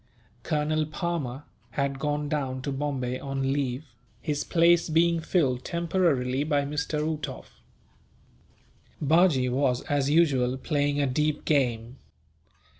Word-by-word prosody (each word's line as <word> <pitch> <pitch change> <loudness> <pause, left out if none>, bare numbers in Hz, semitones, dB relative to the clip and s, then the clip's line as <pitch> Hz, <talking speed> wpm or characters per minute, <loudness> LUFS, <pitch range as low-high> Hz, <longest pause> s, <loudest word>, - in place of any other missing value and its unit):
Colonel 155 +1 0
Palmer 155 -5 -3 0.3
had 140 -1 -1
gone 150 0 -1
down 135 -4 -2
to 140 - -2
Bombay 135 -3 -2
on 135 -1 -2
leave, 140 0 -2 0.3
his 145 -1 -2
place 170 0 +3
being 165 +1 +3
filled 140 -7 0
temporarily 165 -7 0
by 145 -2 +1
Mr. 150 +2 -2
Uhtoff. 155 -1 -6 1.4
Bajee 155 -4 +3
was, 130 -1 +1
as 145 -1 0
usual, 135 -6 +3
playing 145 0 0
a 145 - +2
deep 150 +3 -1
game. 125 -4 0
145 Hz, 115 wpm, -27 LUFS, 130-155 Hz, 1.4 s, place